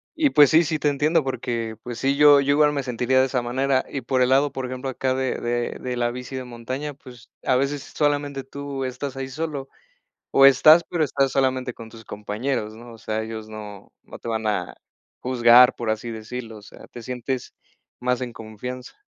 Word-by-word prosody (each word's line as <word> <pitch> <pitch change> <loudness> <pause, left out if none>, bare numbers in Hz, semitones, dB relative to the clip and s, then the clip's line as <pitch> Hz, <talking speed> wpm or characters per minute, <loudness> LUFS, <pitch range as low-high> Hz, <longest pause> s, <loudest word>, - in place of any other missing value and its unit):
Y, 300 -3 +2
pues, 145 -2 +7
sí, 160 +2 +6
sí, 160 -1 -2
te 150 - 0
entiendo 150 +3 +2
porque, 120 -4 -3
pues, 120 -1 -6
sí, 135 +1 +1
yo 145 -1 +7
yo 140 +1 +1
igual 150 0 +4
me 140 - -1
sentiría 125 +1 +1
de 130 - +5
esa 125 -2 -1
manera, 130 +2 0
y 135 - -4
por 130 +1 0
el 125 - +1
lado, 135 +2 +3
por 130 -1 -4
ejemplo, 130 +1 -5
acá 130 0 -1
de 130 -1 -1
de 120 0 -2
de 125 -1 -4
la 120 0 +1
bici 125 +2 -7
de 130 -1 -5
montaña, 130 +5 -6
pues, 125 -4 -15
a 130 - +2
veces 140 +1 -1
solamente 145 -2 0
tú 140 0 -5
estás 130 +1 -5
ahí 135 0 -4
solo, 145 -1 -4 0.6
o 135 - +7
estás, 155 +4 +7
pero 170 -3 -1
estás 135 -1 0
solamente 130 -2 0
con 115 - -10
tus 115 -1 -13
compañeros, 110 +2 -3
¿no? 120 +1 -12
O 115 - -13
sea, 110 0 -3
ellos 110 -1 -7
no 105 -2 -10
no - - -11
te - - -7
van 110 -1 -2
a 100 -4 -1 0.5
juzgar, 125 0 +6
por 115 -2 -3
así 110 +2 -3
decirlo, 115 0 -7
o - - -15
sea, 100 - -14
te 120 - -10
sientes 125 +1 -4 0.5
más 125 0 0
en 125 -2 -4
confianza. 125 - -8
130 Hz, 210 wpm, -23 LUFS, 120-140 Hz, 0.6 s, pues